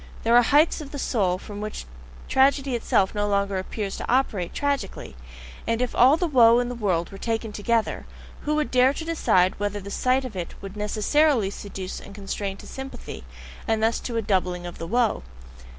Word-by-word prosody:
There 230 Hz, +1 st, +4 dB
are 245 Hz, -, +8 dB
heights 295 Hz, +6 st, +3 dB
of 290 Hz, -, -8 dB
the 285 Hz, -, -7 dB
soul 195 Hz, -9 st, 0 dB
from 205 Hz, +2 st, -8 dB
which 215 Hz, 0 st, -5 dB, 0.4 s
tragedy 270 Hz, 0 st, +3 dB
itself 200 Hz, -4 st, +1 dB
no 205 Hz, -1 st, 0 dB
longer 200 Hz, -1 st, 0 dB
appears 195 Hz, +1 st, -4 dB
to -, -, -4 dB
operate 215 Hz, -9 st, +1 dB
tragically; 285 Hz, -1 st, -3 dB, 0.5 s
and 230 Hz, 0 st, +1 dB
if 250 Hz, -1 st, -1 dB
all 265 Hz, +5 st, +6 dB
the 355 Hz, -, 0 dB
woe 240 Hz, -7 st, +6 dB
in 245 Hz, 0 st, 0 dB
the -, -, -3 dB
world 190 Hz, -8 st, -1 dB
were 195 Hz, -, -9 dB
taken 225 Hz, -1 st, -2 dB
together, 225 Hz, +2 st, -1 dB, 0.3 s
who 300 Hz, +1 st, -1 dB
would 305 Hz, -1 st, -1 dB
dare 255 Hz, +2 st, +4 dB
to 320 Hz, -, -5 dB
decide 190 Hz, -, +2 dB
whether 205 Hz, 0 st, -2 dB
the 200 Hz, 0 st, -9 dB
sight 255 Hz, +4 st, +1 dB
of 235 Hz, -5 st, -7 dB
it 175 Hz, -2 st, -5 dB
would 195 Hz, 0 st, -9 dB
NECESSARILY 215 Hz, +2 st, +2 dB
seduce 195 Hz, -2 st, -6 dB
and 200 Hz, -, -12 dB
constrain 195 Hz, -1 st, -4 dB
to -, -, -12 dB
sympathy, 265 Hz, 0 st, -8 dB, 0.4 s
and 220 Hz, -1 st, +1 dB
thus 225 Hz, +1 st, +2 dB
to 235 Hz, -2 st, -4 dB
a 225 Hz, -, 0 dB
doubling 180 Hz, -3 st, 0 dB
of 175 Hz, -, -8 dB
the 165 Hz, -, -5 dB
woe?... 235 Hz, +2 st, +1 dB
225 Hz, 200 wpm, -25 LUFS, 200-260 Hz, 0.5 s, are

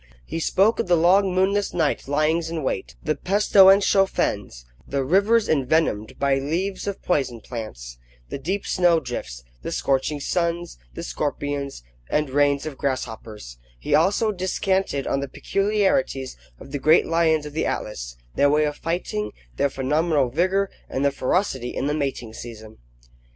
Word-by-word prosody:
He 165 Hz, -, -4 dB
spoke 195 Hz, +7 st, +2 dB
of -, -, 0 dB
the 175 Hz, -1 st, +4 dB
long 185 Hz, +4 st, +4 dB
moonless 195 Hz, +2 st, +1 dB
night 160 Hz, -6 st, 0 dB
lyings 155 Hz, +3 st, +1 dB
in 165 Hz, -2 st, -3 dB
wait, 95 Hz, -, -3 dB
the 155 Hz, -, +1 dB
pestilential 195 Hz, +2 st, +5 dB
fens, 80 Hz, -, -2 dB, 0.2 s
the 140 Hz, -1 st, -1 dB
rivers 200 Hz, -, +3 dB
envenomed 140 Hz, -6 st, +1 dB
by 140 Hz, -1 st, +2 dB
leaves 180 Hz, +9 st, -2 dB
of 200 Hz, -, -4 dB
poison 135 Hz, -8 st, 0 dB
plants, -, -, -8 dB, 0.3 s
the -, -, -5 dB
deep 190 Hz, +8 st, -2 dB
snow 175 Hz, -2 st, +3 dB
drifts, -, -, -6 dB, 0.2 s
the -, -, -5 dB
scorching 135 Hz, +2 st, 0 dB
suns, 170 Hz, -, -2 dB, 0.2 s
the -, -, -5 dB
scorpions, 140 Hz, -, -3 dB, 0.3 s
and 150 Hz, -3 st, 0 dB
rains 145 Hz, +1 st, +2 dB
of 150 Hz, -4 st, -6 dB
grasshoppers; 110 Hz, -, -4 dB, 0.2 s
he -, -, -2 dB
also 200 Hz, +7 st, +3 dB
descanted 190 Hz, -5 st, -1 dB
on 135 Hz, -, 0 dB
the 140 Hz, -, -3 dB
peculiarities 195 Hz, -, 0 dB, 0.2 s
of -, -, -12 dB
the 145 Hz, -, -3 dB
great 155 Hz, +4 st, +5 dB
lions 160 Hz, -2 st, +2 dB
of 150 Hz, -, -8 dB
the 160 Hz, -, -1 dB
Atlas, 60 Hz, -, -4 dB, 0.2 s
their 145 Hz, -, +3 dB
way 150 Hz, +1 st, +3 dB
of 150 Hz, 0 st, -3 dB
fighting, 135 Hz, -11 st, -3 dB, 0.3 s
their 140 Hz, -, +2 dB
phenomenal 145 Hz, +1 st, +1 dB
vigour; 185 Hz, +8 st, +1 dB, 0.2 s
and 135 Hz, +2 st, -1 dB
their 140 Hz, -, +3 dB
ferocity 130 Hz, -3 st, -1 dB
in -, -, -2 dB
the 145 Hz, -, 0 dB
mating 135 Hz, -6 st, -3 dB
season. 110 Hz, -2 st, -10 dB
150 Hz, 155 wpm, -23 LUFS, 130-180 Hz, 0.3 s, pestilential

